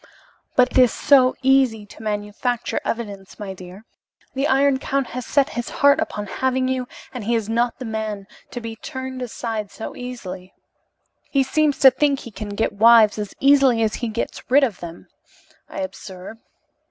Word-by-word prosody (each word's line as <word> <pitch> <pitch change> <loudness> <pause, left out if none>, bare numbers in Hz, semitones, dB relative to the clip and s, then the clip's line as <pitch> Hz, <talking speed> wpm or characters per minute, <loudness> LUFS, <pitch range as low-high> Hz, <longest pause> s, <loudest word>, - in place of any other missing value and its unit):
"But 250 0 +4
it - - +3
is 250 -2 +6
so 260 -3 +4
easy 260 -5 +3
to 205 - -14
manufacture 215 +3 -2
evidence, 205 -4 -5
my 200 -2 -6
dear. 185 +3 -12 0.5
The 275 +2 0
Iron 270 -1 +3
Count 275 0 -1
has 250 0 -6
set 280 -2 +2
his 240 0 -4
heart 285 +2 +4
upon 315 -10 -3
having 260 +5 -1
you, 255 -1 -2 0.3
and 245 -5 -6
he 235 +2 +1
is 225 -3 -1
not 235 +1 0
the 255 - -7
man 220 -3 -4 0.2
to 245 - -6
be 230 -1 -7
turned 260 +2 -7
aside 225 -3 -4 0.3
easily." 200 -7 -8 0.7
"He 275 -1 +2
seems 300 +2 +1
to 265 - +9
think 280 +1 +1
he 235 - -10
can 215 0 -7
get 205 +2 -1
wives 220 0 +6
as 205 -2 -5
easily 270 -4 +4
as 215 -1 0
he 240 - -3
gets 225 +3 -5
rid 275 +3 +5
of 225 -9 -1
them, 170 -1 -9 0.6
I - - -5
observe. 190 +2 -8
235 Hz, 175 wpm, -22 LUFS, 210-260 Hz, 0.7 s, to